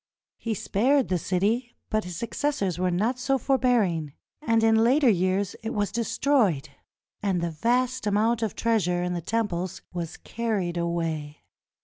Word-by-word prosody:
He 225 -2 -2
spared 260 +8 +2
the 180 -2 +1
city, 215 +9 0 0.2
but 215 -2 0
his 180 -1 -6
successors 220 - -1
were 185 0 +1
not 220 +8 0
so 270 +2 +1
forbearing, 225 - +1 0.3
and 230 -5 +2
in 225 0 +5
later 265 +4 +4
years 185 +1 0
it 225 - -4
was 205 -1 0
destroyed 230 - +1 0.5
and 195 -3 0
the 170 0 -2
vast 245 +8 0
amount 220 +3 +2
of 220 -3 -2
treas 225 -6 +1
ure 175 0 0
in 180 0 -1
the 175 - -3
temples 185 -3 -2
was 170 -2 -5
carried 210 -7 -2
away. 165 -3 -3
205 Hz, 155 wpm, -26 LUFS, 175-235 Hz, 0.5 s, in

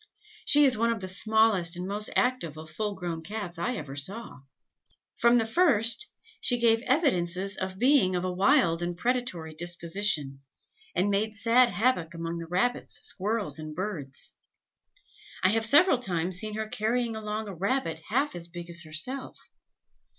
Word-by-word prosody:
She 295 0 +6
is 255 -5 +2
one 230 0 +2
of 230 - -2
the 190 - -5
smallest 200 -3 +3
and 180 +1 -4
most 210 +2 -3
active 250 - 0
of 155 0 -9
full 205 +4 -3
grown 175 -3 -4
Cats 180 -1 -6
I 245 +8 -1
ever 145 -8 -7
saw. 195 +7 -4 0.8
From 235 +1 +4
the 225 - +2
first 240 - +2 0.3
she 260 - +2
gave 225 -1 +3
evidences 195 - +1
of 185 0 -4
being 245 -6 +4
of 180 +1 -1
a 185 - -1
wild 190 - +3
and 175 0 -3
predatory 235 -10 -2
disposition, 170 -4 -1 0.5
and 195 +3 +1
made 215 +2 0
sad 240 +4 +4
havoc 205 -10 0
among 165 0 -4
the 165 - -7
rabbits, 185 +9 -1
squirrels, 200 -6 -1
and 155 -1 -7
birds. 170 -8 -4 1.1
I 185 - +5
have 225 +2 +1
several 295 +1 +6
times 180 -5 -1
seen 215 0 -3
her 220 0 -3
carrying 225 +2 -1
along 215 0 -4
a 200 - -6
rabbit 185 -3 -1
half 275 +6 +1
as 170 -1 -5
big 175 0 -9
as 170 0 0
herself. 175 - -5
200 Hz, 165 wpm, -28 LUFS, 170-235 Hz, 1.1 s, She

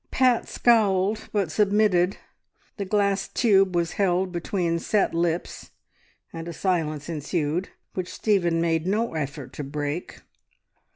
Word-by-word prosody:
Pat 255 -2 +2
scowled, 210 -3 +2
but 195 -6 0
submitted. 200 -1 +2 0.6
The 200 - -3
glass 200 0 +1
tube 195 -6 +3
was 170 -1 +1
held 185 -1 +1
between 170 -1 -1
set 205 +4 +1
lips, 170 0 -2 0.6
and 165 0 -6
a 170 - -5
silence 155 -5 -1
ensued 160 +2 -2 0.2
which 185 -1 -4
Stephen 175 -6 +1
made 165 0 0
no 215 +3 0
effort 140 -4 -5
to 150 - -5
break. 145 +4 -4
180 Hz, 125 wpm, -25 LUFS, 165-200 Hz, 0.6 s, tube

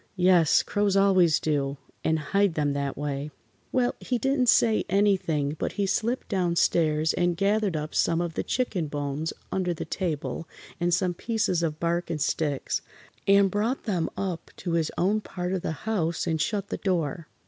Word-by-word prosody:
Yes, 180 -3 +5
crows 205 -1 +1
always 185 -5 +4
do, 140 -2 -1 0.3
and 160 - +2
hide 195 +4 +1
them 145 -2 +1
that 140 -1 -2
way. 145 0 -3 0.4
Well, 250 -1 +2
he 250 - -1
didn't 265 0 +2
say 225 -2 +4
anything, 180 -7 +1
but - - -2
he 200 - 0
slipped 235 +6 -1
down 180 -4 0
stairs 155 -2 +2
and 175 -1 +1
gathered 200 -2 +1
up 150 0 -5
some 165 0 +2
of 170 -1 -2
the - - -1
chicken 210 -10 -1
bones 145 +2 -3 0.2
under 180 -2 0
the - - -5
table 165 -1 -3 0.3
and 175 0 +1
some 175 +1 +1
pieces 215 -3 0
of 155 -2 -2
bark 170 +1 -1
and 160 -2 -2
sticks, 145 -1 -1 0.5
and 200 -1 +5
brought 220 +7 -1
them 180 -7 -1
up 185 -4 -3
to 175 - -4
his 165 -2 +1
own 205 +4 +2
part 180 -2 -4
of 190 - -1
the - - -2
house 170 -7 0
and 160 -3 0
shut 200 -2 -1
the - - -3
door. 165 -5 -1
175 Hz, 180 wpm, -26 LUFS, 155-200 Hz, 0.5 s, Yes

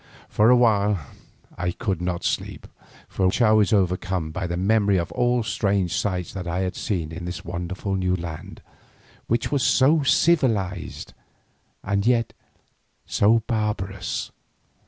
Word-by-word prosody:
For 105 +2 +3
a 125 - +7
while 105 -5 +3 0.6
I 90 0 0
could 95 -4 -3
not 90 -1 -2
sleep, - - -3 0.4
for 95 -1 +1
I 115 -3 +5
was 110 -2 +4
overcome 90 -4 0
by 90 +3 -3
the 85 0 -3
memory 100 +1 +2
of 85 -2 -2
all 120 -1 +1
the - - -8
strange 100 -4 0
sights 95 -4 -2
that 90 -3 -6
I 90 +2 -1
had 95 0 -2
seen 85 -8 -3
in 80 +2 -7
this 90 -1 -6
wonderful 90 +3 -4
new 90 -1 +1
land 85 -3 -8 0.6
which 120 +1 0
was 140 -2 +1
so 140 +5 +4
civilised 115 - +1 0.7
and 100 0 0
yet 120 -2 +2 0.7
so 110 +2 +3
barbarous. 105 -5 -3
100 Hz, 145 wpm, -23 LUFS, 90-110 Hz, 0.7 s, a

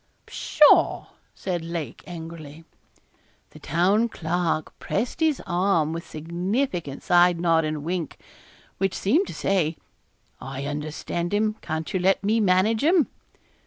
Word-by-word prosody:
'Pshaw!' 300 -1 +4 0.3
said 175 -3 -3
Lake, 165 -6 -5
angrily. 160 -2 -9 0.9
The - - -13
Town 200 +7 +2
Clerk 165 -3 -2
pressed 230 +5 -2
his 315 -4 +1
arm 175 -3 +1
with 165 0 -5
a - - -18
significant 170 - -3
side 175 -1 +4
nod 165 -2 +3
and 155 0 -2
a - - -6
wink, 170 0 -3 0.6
which 195 0 0
seemed 315 - +2
to - - -7
say, 175 -5 0 0.6
'I 135 +1 -6
understand 155 +5 -3
him; 215 +1 +1
can't 160 0 -4
you 185 - +1
let 190 +2 +2
me 215 +3 +2
manage 205 +3 +2
him?' 330 -1 +4
175 Hz, 135 wpm, -24 LUFS, 160-200 Hz, 0.9 s, Pshaw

